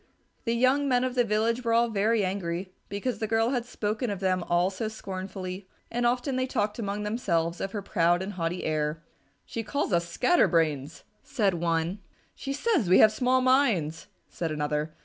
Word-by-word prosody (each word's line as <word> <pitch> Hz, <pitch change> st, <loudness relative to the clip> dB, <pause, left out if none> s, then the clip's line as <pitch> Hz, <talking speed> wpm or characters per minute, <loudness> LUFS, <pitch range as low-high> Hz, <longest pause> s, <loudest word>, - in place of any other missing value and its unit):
The 230 Hz, 0 st, +1 dB
young 260 Hz, +4 st, +3 dB
men 250 Hz, -2 st, +2 dB
of 255 Hz, -1 st, -1 dB
the 245 Hz, -1 st, +3 dB
village 230 Hz, +2 st, 0 dB
were 230 Hz, -1 st, +1 dB
all 235 Hz, +1 st, +4 dB
very 215 Hz, 0 st, +2 dB
angry 185 Hz, -1 st, -3 dB, 0.2 s
because 205 Hz, +5 st, -3 dB
the 220 Hz, -, -1 dB
girl 225 Hz, +1 st, +2 dB
had 245 Hz, -3 st, -1 dB
spoken 215 Hz, +2 st, -2 dB
of 200 Hz, -2 st, -3 dB
them 185 Hz, -1 st, +1 dB
all 175 Hz, +2 st, +2 dB
so 205 Hz, +3 st, -3 dB
scornfully, 190 Hz, -2 st, -6 dB, 0.2 s
and 240 Hz, 0 st, +1 dB
often 250 Hz, +2 st, 0 dB
they 255 Hz, 0 st, 0 dB
talked 210 Hz, -4 st, -1 dB
among 205 Hz, -1 st, -3 dB
themselves 175 Hz, -6 st, -1 dB
of 195 Hz, -, -3 dB
her 205 Hz, -2 st, -3 dB
proud 175 Hz, -2 st, +2 dB
and 200 Hz, +2 st, -5 dB
haughty 175 Hz, 0 st, -2 dB
air. 155 Hz, +1 st, -1 dB, 0.4 s
"She 230 Hz, -, -4 dB
calls 225 Hz, 0 st, -2 dB
us 170 Hz, 0 st, +1 dB
Scattered 355 Hz, -, +3 dB
Brains," 155 Hz, -3 st, 0 dB, 0.2 s
said 210 Hz, -8 st, 0 dB
one. 170 Hz, +2 st, -1 dB, 0.3 s
"She 275 Hz, -, -6 dB
says 290 Hz, -, +1 dB
we 185 Hz, -, +7 dB
have 215 Hz, -, +7 dB
small 255 Hz, +3 st, +2 dB
minds," 235 Hz, -, +2 dB, 0.2 s
said 165 Hz, -, -4 dB
another. 150 Hz, +1 st, -2 dB
205 Hz, 190 wpm, -27 LUFS, 175-240 Hz, 0.4 s, we